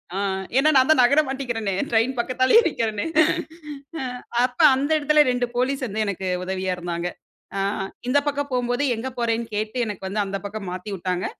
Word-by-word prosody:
ஆ - - -2 0.4
ஏன்னா 285 +3 +5
நான் 260 +2 +4
தான் 315 - +5
நகர 280 +5 +5
மாட்டிக்குறனே, 240 -7 -2 0.2
ட்ரெயின் 230 +3 +2
பக்கத்தாலேயே 255 - +4
நிக்கறனே. 220 -9 -2 1.0
அ - - -3 0.4
அப்ப 250 0 -7 0.2
அந்த 275 +3 -1
எடத்துலே 300 +1 +4
ரெண்டு 245 0 0
போலீஸ் 265 +1 0
வந்து 215 +1 -1
எனக்கு 190 -1 -3 0.2
உதவியா 185 0 -2
இருந்தாங்க. 175 0 -3 0.5
அ - - 0 0.5
இந்த 270 - +3
பக்கம் 285 -1 -2
போகும்போது, 245 +2 0
எங்கே 260 +4 -4
போறேன்னு 230 0 0
கேட்டு 215 +3 -3
எனக்கு 195 -2 -5
வந்து, 205 +2 -1
அந்த 195 0 -3
பக்கம் 200 -2 -5
மாத்திவிட்டாங்க. 185 -1 -3
230 Hz, 165 wpm, -23 LUFS, 195-260 Hz, 1.0 s, ஏன்னா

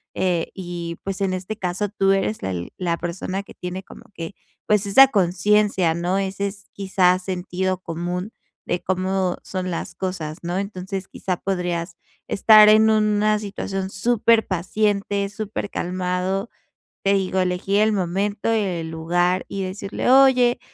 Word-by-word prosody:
Eh, 180 -3 0
y 175 -2 -6
pues 195 0 -4
en 190 -1 +1
este 185 +4 -4
caso, 190 +1 -2
tú 195 -1 +2
eres 195 +2 0
el 90 -2 -4
la 170 -2 -1
persona 185 +3 -4
que - - -14
tiene 180 +1 -6
como - - -14
que, 165 +3 -6 0.3
pues 210 -1 +3
esa 265 +7 +8
conciencia, 200 -3 +2
¿no? 175 +3 -1
Ese 195 +1 -1
es 200 0 -9
quizás 185 -2 +2
sentido 185 0 -2
común 180 +4 -4 0.3
de 175 - -1
cómo 185 0 0
son 185 -1 -4
las 170 - -5
cosas, 170 -5 -4
¿no? 175 +1 -2
Entonces, 195 -1 -5
quizá 185 -2 -3
podrías 175 -3 -2 0.3
estar 215 +1 +7
en 220 +1 +6
una 215 0 +2
situación 195 -2 -4
superpaciente, 205 -2 +1
supercalmado. 190 -1 -3 0.6
Te 195 0 +4
digo, 190 -1 0
elegir 185 +2 +1
el 215 0 +3
momento 200 +3 -1
y 225 - +3
el 175 -5 -3
lugar 175 +3 0
y 195 - -4
decirle: 195 +5 -2
"Oye, 255 -2 +5
190 Hz, 145 wpm, -22 LUFS, 180-205 Hz, 0.6 s, esa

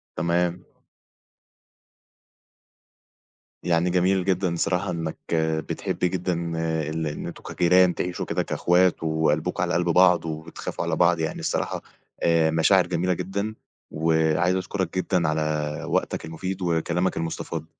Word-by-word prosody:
تمام. 85 +1 0 3.0
يعني 85 0 +2
جميل 90 +1 +2
جدًا، 95 -2 +1
بصراحة 90 +2 0
إنك 80 -2 -4 0.5
بتحب - - -3
جدًا 90 0 0 0.6
ال 80 0 -2
إن 75 - -5
أنتم - - -9
كجيران 90 0 +3
تعيشوا 90 0 -3
كده - - -1
كأخوات 90 0 +2
وقلبْكم 80 +2 0
على 85 -1 -1
قلْب 85 0 +1
بعض، 90 0 +5
وبتخافوا 80 +1 -5
على - - 0
بعض، 85 -1 +3
يعني 80 -1 -2
الصراحة - - -2 0.4
آآ، 80 -1 +3
مشاعر 80 0 +4
جميلة 90 +1 0
جدًا، 100 +5 -3 0.4
و 80 +1 0 0.3
عايز 90 +2 +2
أشكرك 95 -1 -3
جدًا 90 -2 +1
على 75 -1 -1
وقتك - - -1
المفيد 95 +4 -5
وكلامك 85 +1 0
المستفاض. 80 0 -4
85 Hz, 125 wpm, -25 LUFS, 80-90 Hz, 3.0 s, بعض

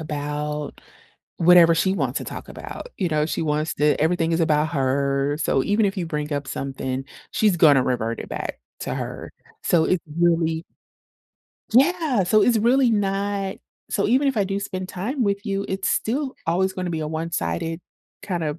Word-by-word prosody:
about, 150 -1 -4 0.6
whatever 170 -1 +7
she 190 +3 +1
wants 135 -8 -1
to - - -7
talk - - -8
about, - - -8
you 185 - 0
know, 155 -2 +1
she 160 - -2
wants 155 0 0
to 150 0 +2
everything 165 +1 +1
is 165 - +1
about 155 -1 +2
her, 140 0 0
so 135 - +2
even 205 +1 +2
if 195 +1 -2
you 180 - -1
bring 150 -2 -3
up 145 -1 -3
something, 135 -1 -4 0.3
she's 210 -5 +2
gonna 145 -5 +6
revert 115 -3 -1
it - - -7
back - - -5 0.2
to - - -3
her, - - -6 0.3
so 165 -2 +3
it's 180 -1 +1 0.2
really 165 -1 +2 1.1
Yeah, 280 - +3
so 210 +4 +4
it's 235 0 +4
really 245 +3 +4
not 200 -1 -1 0.3
so 200 - +1
even 260 +5 +3
if 270 - -1
I 205 - +3
do 195 +1 -2
spend 185 -2 -5
time 240 +10 -3
with 200 0 -1
you, 195 0 -1
it's 190 0 -1
still 265 +4 -1
always 190 +3 +1
gonna 180 -2 -3
be 160 - -2
a 155 - -2
one-sided 160 - -3 0.4
kind 180 -4 -3
of 150 +1 -3
170 Hz, 180 wpm, -23 LUFS, 150-200 Hz, 1.1 s, whatever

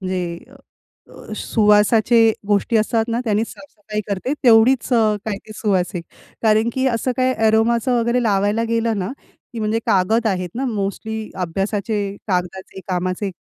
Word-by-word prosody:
म्हणजे 180 -2 -3
अ, 270 - -17 0.8
सुवासाचे 215 +2 +3 0.3
गोष्टी 210 +3 +2
असतात 220 +1 +1
ना, 230 - 0
त्यांनी 215 -1 +1
साफ-सफाई 215 -7 -7
करते. 205 +7 -2
तेवढीच 235 +1 +5 0.4
काय 210 -3 -2
ते - - -10
सुवासीक. 185 -4 -1 0.4
कारण 220 +1 +3
की 260 0 0
असं 250 +1 0
काय 255 0 +2
अरोमाचं 230 +2 +2
वगैरे 235 +2 +1
लावायला 205 +1 +1
गेलं 230 -1 0
ना 190 +6 -3 0.4
की 230 - -5
म्हणजे 215 +1 0
कागद 220 +2 +2
आहेत 185 -3 -1
ना 265 +3 -2
मोस्टली 220 -1 -3 0.2
अभ्यासाचे, 200 +3 -2
कागदाचे, 190 0 -3
कामाचे, 185 +2 -2
215 Hz, 140 wpm, -20 LUFS, 195-230 Hz, 0.8 s, तेवढीच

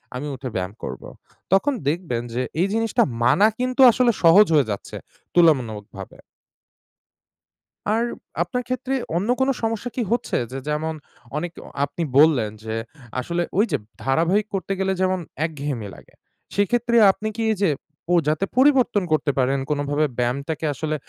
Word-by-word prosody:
আমি 135 +4 -4
উঠে 130 0 -6
ব্যায়াম 95 +1 -2
করব। - - -6 0.5
তখন 265 +10 +3 0.2
দেখবেন 155 -7 -2
যে 125 - -1 0.2
এই 185 - +3
জিনিসটা 225 -1 +2 0.2
মানা 200 - +5
কিন্তু 255 +1 0
আসলে 245 +1 +3
সহজ 175 +6 +8
হয়ে 140 -7 +3
যাচ্ছে 100 - -6 0.4
তুলনামূলকভাবে। 115 - +1 1.7
আর 220 +2 +2 0.4
আপনার 250 -2 -3
ক্ষেত্রে 255 +1 -2 0.2
অন্য 200 +6 -2
কোনো 265 +1 +3
সমস্যা 225 +1 -2
কি 255 - -1
হচ্ছে 240 +1 0
যে 135 - -5
যেমন 155 +2 -1 0.4
অনেক 175 +2 -3 0.3
আপনি 145 +4 -5
বললেন 140 -8 +5
যে 110 0 -4 0.5
আসলে 170 +7 -1
ঐ - - +4
যে - - +2 0.3
ধারাবাহিক 170 +10 +2
করতে 195 +1 -2
গেলে 190 0 +1
যেমন 185 0 +1 0.3
একঘেয়েমি 140 -8 -4
লাগে, - - -17 0.4
সেক্ষেত্রে 235 +4 +1 0.2
আপনি 215 +3 -6
কি 230 - -3
এই 215 - -1
যে 195 - +4 0.4
ও - - +4
যাতে 155 +5 +1
পরিবর্তন 255 -6 +4
করতে 155 -2 +2
পারেন 135 +2 +2
কোনোভাবে 145 +1 0
ব্যায়ামটাকে 140 +6 -2
আসলে 155 +2 -3
165 Hz, 150 wpm, -22 LUFS, 140-215 Hz, 1.7 s, সহজ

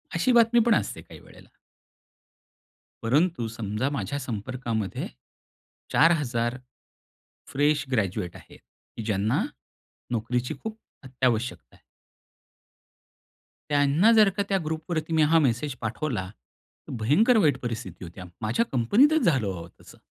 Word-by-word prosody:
अशी 170 +10 +2
बातमी 235 0 +5
पण 235 -2 +5
असते - - -2
काही - - -14
वेळेला. - - -17 1.6
परंतु 145 +2 +1
समजा 110 +3 -2
माझ्या 140 -1 -3
संपर्कामध्ये 115 -3 -4 0.8
4,000 125 -7 +2 0.9
फ्रेश 145 +1 +2
ग्रॅज्युएट 95 -7 -1
आहेत, - - -14 0.4
की 115 - -4
ज्यांना 105 0 0 0.7
नोकरीची 120 +2 -1
खूप 220 0 -6 0.3
अत्यावश्यकता 125 -2 -2
आहे. - - -24 1.9
त्यांना 145 +9 +4
जर 215 -3 +6
का 200 - +2
त्या 195 - +2
ग्रुपवरती 160 +1 -3
मी 160 - +4
हा 165 - +7
मेसेज 130 +3 -1
पाठवला, 110 -2 -3 0.6
तर - - -6
भयंकर 220 - +4
वाईट 145 -4 +3
परिस्थिती 110 -7 -5
होते. 85 +2 -11 0.2
माझ्या 110 - +1
कंपनीतच 250 - +4
झालं 135 - +2
हो 85 -3 -5
तसं. - - -16
130 Hz, 115 wpm, -26 LUFS, 115-165 Hz, 1.9 s, हा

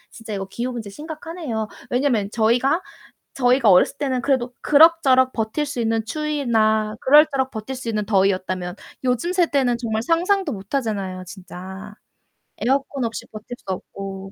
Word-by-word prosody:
진짜 225 -2 -9
이거 195 -1 -4
기후 240 +6 -4
문제 225 -4 -6
심각하네요. 305 - -5 0.2
왜냐면 245 -6 +1
저희가 245 +10 +2 0.5
저희가 245 -4 +4
어렸을 185 +9 +5
때는 260 -4 -1
그래도 255 -2 0
그럭저럭 285 -4 +5
버틸 225 +7 -2
수 280 -4 -4
있는 225 -1 0
추위나 225 -6 0
그럭저럭 275 -2 +4
버틸 220 +3 -6
수 250 -2 -6
있는 215 -2 -1
더위였다면 185 -3 0 0.3
요즘 250 +8 0
세대는 280 -9 +2
정말 220 -2 -2
상상도 345 - +1
못하잖아요, 200 -4 -3
진짜.에어컨 190 +2 -11 0.9
없이 230 0 -5
버틸 220 +3 -8
수 - - -26
없고. 195 +1 -6
235 Hz, 350 characters per minute, -22 LUFS, 210-275 Hz, 0.9 s, 어렸을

